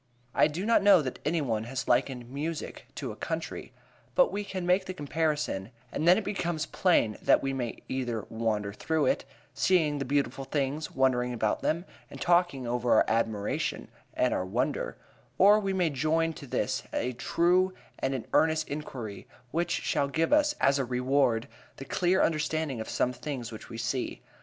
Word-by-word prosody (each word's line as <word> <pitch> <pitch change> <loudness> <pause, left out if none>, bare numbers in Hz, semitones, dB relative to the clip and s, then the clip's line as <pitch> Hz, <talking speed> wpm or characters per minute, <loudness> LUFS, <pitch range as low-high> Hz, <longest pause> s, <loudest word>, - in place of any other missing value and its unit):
I - - +5
do 165 +6 -4
not 230 +1 +4
know 195 -5 +6
that 130 - -5
any 160 +2 +1
one 110 -5 -1
has 130 +2 -4
likened 125 -1 +1
music 150 +5 -5
to - - -4
a - - -8
country. - - -4 0.4
But - - +5
we 205 - -2
can 190 -3 -4
make 185 +2 +3
the 185 - -5
comparison, 150 - -1 0.2
and 160 - -1
then 180 - +8
it 220 - -1
becomes 175 -6 -2
plain 155 - +2
that - - +4
we 135 0 -1
may 125 -3 -4
either 120 -5 -2
wander 110 -3 -1
through 160 +8 0
it, 270 - +1 0.3
seeing 155 -6 +2
the - - -1
beautiful 135 -1 0
things, 140 +2 -2
wondering 125 -2 +2
about 110 -3 0
them, 170 +3 0 0.2
and - - -10
talking 175 -7 +2
over 120 0 0
our - - +5
admiration 110 -2 -1 0.3
and - - +2
our - - 0
wonder; 95 - -2 0.4
or 205 +3 +7
we 195 -2 -1
may 180 -4 +1
join 160 +4 +1
to 140 - -10
this - - -1
a 125 +2 -1
true 175 +8 +2 0.3
and 135 0 0
an 125 - -4
earnest 160 0 +3
inquiry, 125 -8 -6 0.2
which 170 +3 0
shall 140 - +1
give 160 - +1
us, 300 0 +4
as 140 0 +3
a - - +2
reward, 125 -1 +1 0.3
the 135 - -7
clear 180 +6 +2
understanding 155 -5 0
of 110 - -6
some 125 - 0
things 125 -4 -5
which 110 - -9
we 115 - -7
see. 120 +2 -3
145 Hz, 180 wpm, -29 LUFS, 125-170 Hz, 0.4 s, then